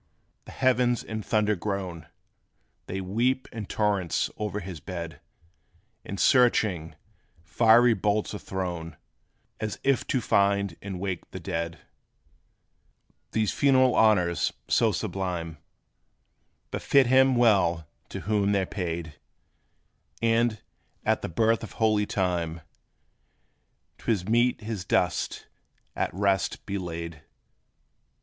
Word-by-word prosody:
the - - -11
heavens 125 -2 +2
in 110 0 -5
thunder 105 0 +1
groan; 90 -4 -4 0.8
They 95 +1 -3
weep 120 +8 0
in 110 -3 -6
torrents 100 -5 0
o'er 105 -1 -2
his 95 -4 -7
bed; 85 -3 -7 0.8
And 100 - -6
searching, 100 - +3 0.5
fiery 115 +7 +5
bolts 105 -1 0
are 105 - -5
thrown, 90 -4 -5 0.6
As 110 -1 -3
if 135 -1 +1
to 130 - +1
find 100 -4 +2
and 95 -2 -6
wake 95 -2 -4
the - - -7
dead. 85 0 -4 1.5
These 110 -2 +1
funeral 130 -2 +4
honors, 90 -6 +3 0.2
so - - +3
sublime, 85 -4 -3 1.1
Befit 140 -2 +3
him 130 +1 +5
well 95 -9 +3 0.2
to - - -6
whom 105 -1 +1
they 100 -1 +2
're - - -3
paid; 85 -5 -5 1.0
And, 115 -1 +1 0.4
at - - +2
the - - -4
birth 115 +6 +2
of 110 - -8
holy 110 -2 +2
time, 85 -3 -1 1.4
'T - - -1
is 95 -4 -1
meet 120 +2 +2
his 105 -3 -4
dust 90 -1 0 0.5
at - - -1
rest 95 -1 0
be 100 0 -3
laid. 85 -3 -6
100 Hz, 115 wpm, -27 LUFS, 90-115 Hz, 1.5 s, fiery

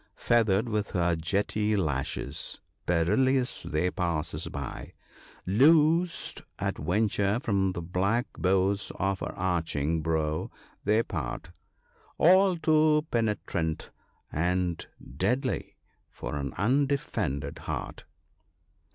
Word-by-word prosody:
Feathered 115 -2 +2
with 105 -2 -1
her 85 -2 +2
jetty 105 +5 0
lashes, 75 -9 -2 0.3
perilous 125 +10 +2
they 90 +4 -1
pass 85 -3 -2
us 75 +3 -4
by: 70 -3 -6 0.5
Loosed 160 - +3 0.2
at - - -2
venture 100 +5 +1
from 100 -6 +1
the 85 -3 -5
black 95 +8 0
bows 95 +2 +1
of 95 -1 -1
her - - -4
arching 80 -4 0
brow 80 -1 -1 0.3
they 110 +3 +3
part, 80 - -5 0.7
All 185 +2 +5
too 155 -1 +3
penetrant 105 -8 -1 0.4
and 90 +1 0 0.3
deadly 125 - -1 0.3
for - - -6
an 70 -3 -3
undefended 130 - 0
heart. - - -5
95 Hz, 100 wpm, -28 LUFS, 85-120 Hz, 0.7 s, All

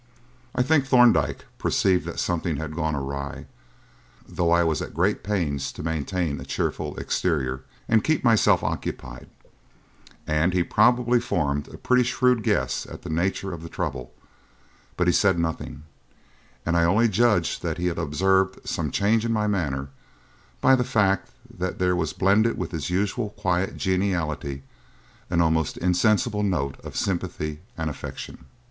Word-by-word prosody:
I 125 - +3
think 140 0 +2
Thorndyke 115 - +4
perceived 95 -2 +1
that - - -5
something 85 -2 -1
had 80 +1 -5
gone 80 -2 -1
awry, 70 0 -5 0.8
though 85 -1 0
I 85 +1 +4
was 80 -3 0
at - - -7
great 95 +5 +1
pains 80 -10 -1
to - - -8
maintain 80 -1 -2
a - - -6
cheerful - - -3
exterior 65 -7 -1 0.2
and 110 -2 +3
keep 155 -2 +1
myself 115 -4 +4
occupied, - - -5 1.0
and 80 +4 +1
he 90 -1 +2
probably 120 +4 +3
formed 75 -11 -1
a - - -11
pretty 125 0 +3
shrewd 125 0 +2
guess - - 0
at - - -10
the - - -5
nature 95 +3 -1
of 85 - -7
the 85 - -8
trouble; 65 -5 -4 0.9
but 90 - +2
he 90 - +3
said 95 -4 +3
nothing, 80 -3 -3 0.8
and 85 - +1
I 85 - +4
only 100 +8 +4
judged 105 -4 +2
that - - -2
he 90 - -2
had 85 -1 -1
observed 95 +4 +1
some - - -1
change 110 +3 +2
in 115 - -1
my 105 -2 +1
manner 70 -10 -1 0.7
by 130 - +6
the 125 - +1
fact 105 -6 +1 0.2
that 90 0 -4
there 90 0 +2
was 80 -3 -1
blended 105 +4 +2
with - - -4
his 80 -3 -3
usual 100 +4 -1
quiet 95 -2 -1
geniality 85 -8 -1 0.7
an 85 -1 +2
almost 80 -2 +1
insensible 105 +4 +2
note 80 -9 -1
of - - -9
sympathy 85 -5 -2 0.2
and 80 -1 -2
affection. 75 - -7
90 Hz, 155 wpm, -25 LUFS, 80-105 Hz, 1.0 s, by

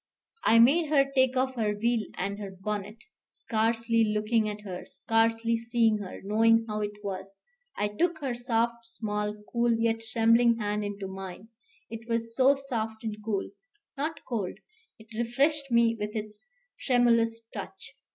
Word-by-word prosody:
I 230 - +5
made 290 +7 +5
her 275 -2 +3
take 260 -1 +3
off 260 +1 +1
her 215 -4 0
veil 235 +2 +2 0.2
and 200 +2 -3
her 200 -2 -5
bonnet, 210 +1 -4 0.2
scarcely 230 0 0
looking 215 +1 +1
at 210 0 -6
her, 185 -3 -6
scarcely 225 0 +1
seeing 230 -2 +2
her, 195 -3 -7
knowing 225 +3 +4
how 210 -1 -2
it 205 0 -5
was: 195 0 -5 0.4
I 205 - +1
took 330 +10 0
her 270 -5 -2
soft, 235 -1 0
small, 210 -2 -3 0.2
cool, 235 0 +3
yet 225 0 +1
trembling 230 +1 +3
hand 210 -1 -1
into 200 -1 -4
mine; 190 +2 -8 0.4
it 230 +1 -8
was 230 0 -2
so 265 +3 +5
soft 225 -5 -4
and 220 -2 -3
cool, 205 -3 -2 0.4
not 300 +3 -4
cold, 205 -7 -3 0.4
it 225 +1 -16
refreshed 275 +5 +1
me 235 -1 +4
with 210 +1 -4
its 210 - -6 0.3
tremulous 230 -2 +3
touch. - - -7
225 Hz, 155 wpm, -28 LUFS, 210-235 Hz, 0.4 s, I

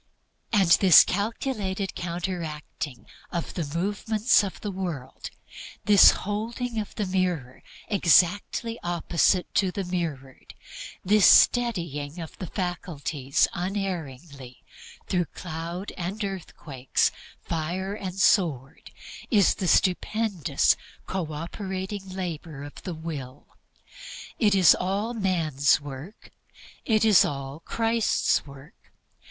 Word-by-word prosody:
And 200 -5 +3
this 185 -5 +8
calculated 205 -1 -2
counteracting 170 -5 -5 0.3
of 170 -2 -4
the 170 - -3
movements 210 +5 +2
of 195 - -6
the 205 - -4
world, 175 -9 -6 0.6
this 205 -2 +8 0.2
holding 225 +3 -3
of 210 - -6
the 210 - -1
mirror 180 -9 -2 0.3
exactly 205 +5 +2
opposite 175 +1 +1
to 190 - +2
the 195 - -3
Mirrored, 160 -8 -5 0.5
this 205 +1 +5
steadying 170 - +3
of 165 -2 -8
the 185 - -5
faculties 160 -7 -1
unerringly 165 -9 -5 0.4
through 180 -2 0
cloud 170 +4 -6
and 190 +5 -4
earthquake, 155 -9 -8 0.5
fire 175 +4 -3
and 190 -3 -6
sword, 160 - +1 0.4
is 205 -5 +4
the 185 - -3
stupendous 185 -4 +2 0.3
co 180 -5 -3
operating 190 +4 -5
labor 170 -6 -6
of 145 - -10
the 180 -3 -5
Will. 145 -5 -7 0.9
It 210 -4 +3
is 185 -3 +7
all 200 +6 -2
man's 165 - +1
work. 145 +7 -10 0.5
It 220 -1 +2
is 210 -5 +7
all 140 +1 -4
Christ's 225 -3 0
work. 140 0 -13
180 Hz, 105 wpm, -26 LUFS, 155-200 Hz, 0.9 s, this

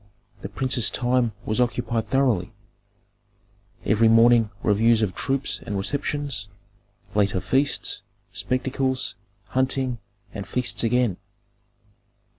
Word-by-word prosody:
The - - -6
prince's 125 -4 0
time 125 -2 +1
was 110 +3 0
occupied 120 -2 -1
thoroughly, 120 -7 +1 1.3
every 110 +1 +4
morning 115 0 +5
reviews 110 +2 +3
of 95 -4 -1
troops 135 0 -1
and 105 -4 -3
receptions; 140 0 -2 0.7
later 100 -2 +2
feasts, 130 +3 0 0.3
spectacles, 130 0 -1 0.4
hunting, 130 -2 0 0.3
and 100 - -6
feasts 125 -1 -1
again. 115 -4 +2
120 Hz, 95 wpm, -24 LUFS, 110-130 Hz, 1.3 s, morning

